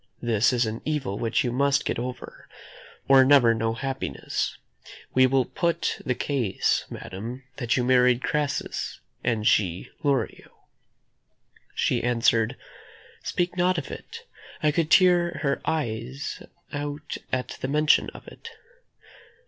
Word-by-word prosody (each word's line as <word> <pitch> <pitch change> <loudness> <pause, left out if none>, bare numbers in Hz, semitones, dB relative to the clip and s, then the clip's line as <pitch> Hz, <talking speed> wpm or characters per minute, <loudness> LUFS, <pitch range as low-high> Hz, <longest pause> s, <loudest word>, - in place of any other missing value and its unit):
This 115 -1 +3
is 120 -1 +2
an 110 +1 -4
evil 140 -10 -2
which 115 +5 +1
you 120 - -1
must 140 +3 +2
get - - -1
over, 125 +1 -7 0.6
or 135 -1 +7
never 130 -4 +6
know 115 0 -1
happiness. 130 - -3 0.6
We 130 0 +6
will 130 -1 +2
put 170 -1 -1
the 125 - -1
case, 120 -10 0
madam, 115 +8 -7
that 120 -2 0
you 125 - +1
married 125 0 +4
Crassus, 145 -2 -2 0.2
and 115 -3 0
she 95 -5 +1
Lorio." 140 -3 -2 1.1
She - - +1
answered: 115 0 +2 0.6
"Speak 175 0 -1
not 180 0 +2
of 155 - -4
it; - - -9 0.4
I 150 - +4
could 160 0 0
tear 175 -2 +4
her 140 -1 0
eyes 135 -3 -3 0.3
out 145 0 -4
at 130 -1 -1
the - - -1
mention 150 +2 +3
of - - -13
it." 460 - -11
130 Hz, 130 wpm, -25 LUFS, 115-145 Hz, 1.1 s, or